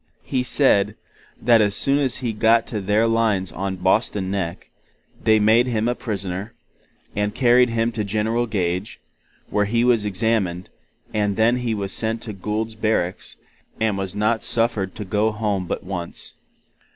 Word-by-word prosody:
he 130 -2 -1
said, 110 -6 +2 0.4
that 115 -1 +5
as 105 -1 +1
soon 140 +1 +2
as 130 -4 0
he 115 - -1
got 115 +2 +3
to 105 -3 -4
their 105 +3 +2
lines 110 -6 +1
on 95 +3 -3
Boston 95 +1 0
Neck, 95 -4 -4 0.5
they 110 -1 +4
made 110 +4 +4
him 115 -2 0
a 120 - +2
prisoner, 100 -2 -5 0.6
and 105 +1 -1
carried 125 -1 +4
him 115 0 0
to 110 -2 -3
General 110 +4 0
Gage, 90 -2 -2 0.5
where 105 0 +2
He 115 +3 +1
was 120 -3 +3
examined, 100 -3 -1 0.4
and 105 -2 0
then 115 +3 +3
He 120 -3 -1
was 100 -2 -2
sent 115 0 -1
to 110 - -6
Gould's 105 +3 -3
Barracks, 110 -5 -2 0.4
and 110 -2 +1
was 95 -2 -4
not 110 +2 +1
suffered 115 -5 0
to 105 - -6
go 105 +3 +1
home 105 -4 -2
but - - -3
once. 90 -2 -6
110 Hz, 165 wpm, -22 LUFS, 100-115 Hz, 0.6 s, that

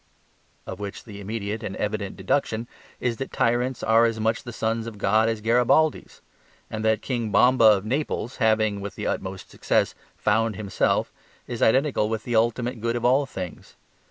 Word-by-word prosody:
Of - - -7
which 100 0 -6
the 100 -2 -10
immediate 105 +1 -4
and 105 -3 -5
evident 105 -2 -3
deduction 110 +3 -1 0.3
is 120 -2 -1
that 135 - -5
tyrants 120 +1 0
are 115 +1 +5
as 115 -1 -1
much 110 +1 0
the 120 - -8
sons 115 0 -2
of 110 -3 -8
God 110 +3 +3
as 110 -2 -2
Garibaldis; 125 +7 +2 0.5
and 110 0 -4
that 110 0 +1
King 120 -4 -2
Bomba 125 +2 +5
of 105 -2 +5
Naples 130 0 -2
having, 110 -3 +2
with 100 0 -6
the - - -5
utmost 95 0 -4
success, - - +1 0.2
"found 110 0 +1
himself" 100 -2 0 0.3
is 120 - -6
identical 130 -3 +3
with 110 -1 -3
the 120 - -2
ultimate 120 +1 +1
good 115 +1 0
in 120 0 -2
all 135 +3 +3
things. 90 -8 -8
110 Hz, 175 wpm, -25 LUFS, 105-120 Hz, 0.5 s, are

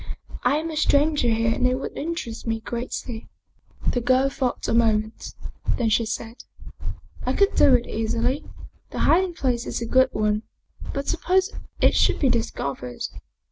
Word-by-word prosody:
I 250 +3 +3
am 320 +2 -2
a - - -5
stranger 295 -3 +3
here 225 0 +2
and 250 - +2
it 255 - +2
would 265 - -5
interest 290 -9 -4
me 225 0 0
greatly." 235 0 -5 0.6
The 245 - +1
girl 255 +3 +3
thought 255 -3 -2
a - - +1
moment. 220 -2 +1 0.4
Then 235 -3 +1
she 225 +1 +2
said, 225 +2 -5 0.4
" - - -10
I - - +2
could 400 0 +3
do 260 - +6
it 240 -1 0
easily 230 +5 -1 0.5
the - - -8
hiding 360 +1 +3
place 245 -5 -1
is - - -2
a 235 - -3
good 260 +2 +4
one 210 0 +1 0.5
but 280 0 -4
suppose 370 +4 +1 0.3
it - - +5
should - - +4
be 275 - +3
discovered?" 140 - -2
245 Hz, 170 wpm, -24 LUFS, 225-280 Hz, 0.6 s, do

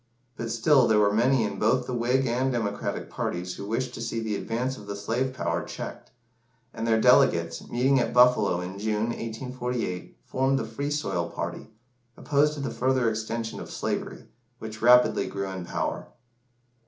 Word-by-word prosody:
But 115 -2 -4
still 120 +3 +4
there 110 - +4
were 105 -1 +4
many 120 +3 +3
in 100 -2 -3
both 125 +4 +2
the 125 - -4
Whig 125 +3 +1
and 130 +2 +1
Democratic 110 -4 -2
parties 90 +1 -3
who 100 - -7
wished 120 +3 -2
to 115 - -7
see 115 0 -2
the 110 -2 -2
advance 125 +5 -2
of 105 -5 -12
the 100 - -4
slave 115 +6 -1
power 130 - -2
checked; - - -7 0.6
and 115 - -3
their 110 -1 +3
delegates, 85 -9 +3
meeting 130 +3 +3
at 120 - 0
Buffalo 125 -7 +4
in 95 +2 -6
June, 110 +1 0
1848, 120 - -4
formed 135 +1 +1
the 115 - -2
Free 125 +6 -4
Soil 95 - -1
party, - - -5 0.5
opposed 150 +1 +2
to 145 - -5
the 135 -4 -3
further 130 -2 +1
extension 110 +1 -4
of - - -8
slavery, - - -4 0.3
which 110 -2 -8
rapidly 125 +1 +5
grew 100 -1 -4
in 95 -2 -6
power. - - -3
115 Hz, 175 wpm, -26 LUFS, 105-130 Hz, 0.6 s, rapidly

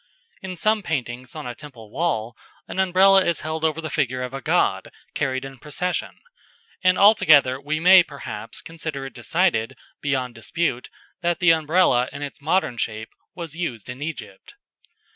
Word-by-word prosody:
In 190 -2 -6
some 215 +5 +1
paintings 125 -7 -4
on - - -6
a 125 - -4
temple 120 -6 -13
wall, 120 -7 -1 0.3
an - - -5
Umbrella 190 +1 +5
is 170 -2 0
held 155 0 -4
over 160 0 +1
the 160 - -5
figure 130 -3 -1
of 125 +1 -6
a 135 - -5
god - - +1 0.2
carried 130 0 -2
in 135 -1 -10
procession, 175 +6 -3 0.7
and 185 0 +4
altogether 150 -10 +5
we 155 +2 -2
may, 185 +2 +8
perhaps, 115 -9 -7
consider 160 -4 -6
it 135 - -8
decided, 135 -9 0 0.2
beyond 130 -4 -1
dispute, 125 +3 -2 0.3
that 175 0 0
the 180 -2 +5
Umbrella 160 -5 +3
in 145 - -7
its 140 -1 -8
modern 155 -5 0
shape 110 -1 -3 0.3
was 165 -3 -7
used 125 - -4
in 125 +3 -10
Egypt. 145 -11 -7
150 Hz, 160 wpm, -23 LUFS, 125-170 Hz, 0.7 s, may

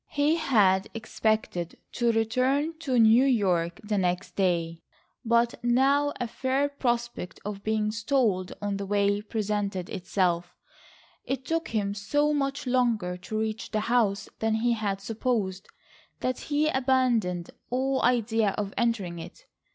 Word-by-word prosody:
He 295 +3 +2
had 210 - +3
expected 220 -5 -1
to 235 -1 +1
return 255 +7 +1
to 265 -6 0
New 225 +2 +6
York 185 -9 +1
the 210 -1 0
next 180 0 -1
day, 170 -3 0 0.4
but 235 0 +1
now 275 +4 +3
a 245 - -1
fair 265 +4 0
prospect 240 -8 -2
of 205 -1 -5
being 215 -1 0
stalled 220 -5 0
on 200 -1 -1
the 200 0 -5
way 205 0 +2
presented 205 -4 -2
itself. 175 -1 -1 0.7
It 265 -1 -4
took 325 +2 -1
him 205 -3 -1
so 290 +9 +1
much 280 0 -1
longer 235 -8 +1
to 190 +4 -5
reach 220 0 -3
the 215 -1 -1
house 215 -3 +1
than 220 0 +1
he 235 +2 +2
had 200 -3 -2
supposed, 210 -3 -2 0.5
that 255 0 -1
he 295 +1 +2
abandoned 250 - +1 0.2
all 265 +2 0
idea 225 -4 +2
of 205 -2 -3
entering 205 -8 0
it. - - -11
220 Hz, 140 wpm, -27 LUFS, 200-255 Hz, 0.7 s, New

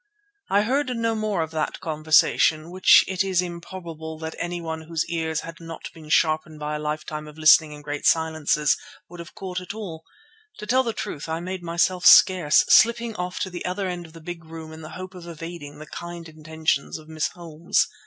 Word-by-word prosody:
I 200 +1 +3
heard 265 +4 0
no 230 0 0
more 215 -5 -1
of 160 - -7
that 155 -1 -2
conversation, 155 +1 +2
which 185 +1 +6
it 190 0 0
is 190 -2 0
improbable 170 -2 -6
that 160 0 -6
anyone 170 -2 -4
whose 165 -1 -1
ears 160 -1 -2
had 165 0 -9
not 165 -1 -8
been 155 -2 -13
sharpened 155 0 +2
by 150 0 -3
a - - -3
lifetime 150 0 -4
of 150 0 -13
listening 155 -1 +6
in 150 0 -11
great 145 0 -2
silences 160 -2 +2 0.3
would 175 0 -11
have 170 - -10
caught 185 -1 -5
at 180 +3 -7
all. 170 -7 -7 0.5
To - - -7
tell 255 +4 +3
the 235 -3 -1
truth, 150 -5 -5
I 160 +1 -2
made 185 +1 -5
myself 175 +1 0
scarce, 175 -6 +7
slipping 235 0 +4
off 180 0 -4
to 190 - -2
the 175 - -6
other 185 +2 -2
end 175 -2 -5
of 160 - -18
the 165 - -12
big 170 +1 -7
room 160 0 -9
in 160 - -10
the 155 - -9
hope 185 +1 -8
of 175 -2 -11
evading 165 -2 -8
the 155 - -9
kind 170 +1 -8
intentions 155 -2 -2
of 155 -1 -14
Miss 160 -1 -1
Holmes. 170 -1 -1
165 Hz, 205 wpm, -24 LUFS, 155-180 Hz, 0.5 s, scarce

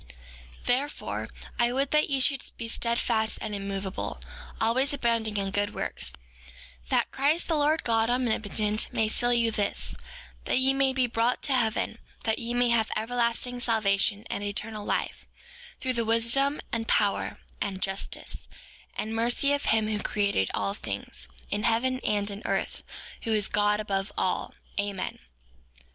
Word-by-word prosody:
5:15 - - -18
Therefore, 270 +4 -1 0.3
I 240 0 +4
would 270 +2 0
that 300 0 +3
ye 275 -1 +1
should 270 0 +3 0.2
be 230 - -4
steadfast 230 -1 +2
and 215 - -4
immovable, 195 -1 -3 0.4
always 260 +6 +2
abounding 230 -4 +1
in 195 -1 0
good 205 +1 -1
works, - - -1 0.8
that - - +2
Christ, 295 +5 +2
the 330 - +2
Lord 305 +2 +3
God 225 -1 +2
Omnipotent, 220 -3 +1
may 220 - +1
seal 240 +3 +2
you 235 -1 +3
his, 210 -2 -1 0.5
that - - +2
you 265 +1 +4
may 270 0 +3
be 260 -1 +2
brought 235 +1 0
to 280 - +1
heaven, 230 -3 0 0.2
that 220 -1 0
ye 235 +1 -2
may 245 0 +3
have 225 -2 +3
everlasting 240 +2 0
salvation 210 -2 +2
and 200 - -3
eternal 210 +1 -2
life, - - -2 0.5
through 260 -1 -1
the 235 -1 +1
wisdom, 235 +6 +3
and 225 -1 -2
power, 205 -1 +1 0.2
and 195 -2 -2
justice, 195 0 -2 0.5
and 220 +1 -3
mercy 240 +5 +3
of 285 - -1
him 220 -1 +3
who 215 -1 -1
created 200 - +1
all 100 0 0
things, 60 - -5 0.2
in 205 - 0
heaven 250 +4 +2
and 205 -4 0
in 200 +1 -6
earth, - - -1 0.4
who 225 - -1
is 210 -2 +2
God 210 0 +2
above 200 -1 -2
all. 185 - -1 0.2
Amen. 200 -2 -2
225 Hz, 155 wpm, -28 LUFS, 210-245 Hz, 0.8 s, I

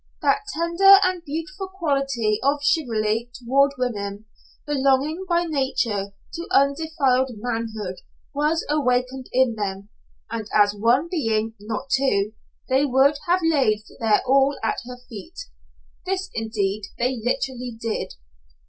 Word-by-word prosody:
That - - +3
tender 340 +4 +6
and 370 -2 0
beautiful 335 +6 -5
quality 275 - 0
of 285 +2 +1
chivalry 225 -6 +1
toward 275 +3 +2
women, 205 -4 -3 0.4
belonging 285 +5 +1
by 345 0 +3
nature 245 -10 -1 0.2
to 335 - -5
undefiled 280 -2 +2
manhood, 220 -4 -4 0.4
was 300 +3 0
awakened 255 -3 0
in 260 -2 +3
them, 200 -2 -4 0.4
and 225 -2 -4
as 205 -1 +5
one 235 +9 +2
being, 225 -10 -1
not 220 +6 -5
two, 220 -6 +2 0.3
they 265 +2 +3
would 280 +1 +3
have 360 +2 +3
laid 260 -10 +2 0.2
their 220 -2 +3
all 275 +2 +3
at 225 - 0
her 250 0 -7
feet. 240 - -10 0.7
This, 380 +1 -3
indeed, 215 -2 -2
they 245 0 -1
literally 250 -1 -2
did. 225 - -3
260 Hz, 125 wpm, -23 LUFS, 220-295 Hz, 0.7 s, tender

